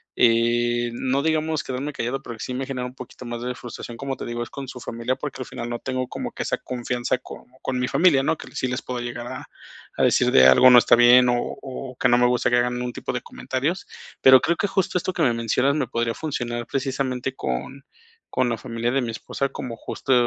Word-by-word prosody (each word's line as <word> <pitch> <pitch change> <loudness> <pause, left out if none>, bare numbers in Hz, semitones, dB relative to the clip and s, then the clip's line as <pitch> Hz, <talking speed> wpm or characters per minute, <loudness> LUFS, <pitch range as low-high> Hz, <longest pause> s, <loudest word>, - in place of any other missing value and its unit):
eh, 120 +1 +3
no 130 +3 0
digamos 155 0 0
quedarme 135 +3 -4
callado, 130 +2 -3
pero 120 - -7
sí 125 - -4
me 135 +1 -2
genera 125 -2 -4
un 125 - -12
poquito 125 0 -10
más 120 0 -5
de 125 0 -2
frustración, 120 -1 -8
como 135 +3 -4
te - - -6
digo, 120 0 -4
es 120 - -5
con 135 +2 -7
su 130 -1 -8
familia, 115 +2 -3
porque, 140 -2 -5
al - - -12
final, 120 - -6
no 120 - -2
tengo 130 0 -3
como - - -5
que - - -6
esa - - -1
confianza, 125 0 -2
con - - -11 0.2
con 130 - -2
mi 125 - 0
familia, 155 -5 +4
¿no?, 155 - +1
que - - -10
sí - - -1
les 125 0 -3
puedo 125 -1 -4
llegar 120 0 -5
a 130 +1 -7 0.5
a - - +3
decir - - +3
de 65 0 +7
algo 95 - +8
no 125 - +10
está - - +5
bien, 125 +1 +7
o 120 - +3 0.3
o 130 -1 -7
que 125 - +3
no 120 - +5
me 125 - +4
gusta 125 0 +2
que 120 - +3
hagan 125 0 +1
algún 125 0 -3
tipo - - -4
de - - -2
comentarios. 130 +2 -3 0.5
Pero 130 -1 +9
creo 170 +4 +1
que 200 - 0
justo 190 -2 0
esto 180 - -1
que 175 - -3
me 120 -5 +3
mencionas 115 +4 +1
me 140 -5 0
podría 115 -1 -1
funcionar 120 -5 -3
precisamente 130 -1 -2
con 70 - -4 0.5
con 130 - +1
la 115 - -1
familia 115 -1 -2
de 135 +1 +1
mi 120 -2 -2
esposa, 140 +4 -3
como 125 -5 -6
justo, 135 - -2
125 Hz, 240 wpm, -23 LUFS, 120-135 Hz, 0.5 s, no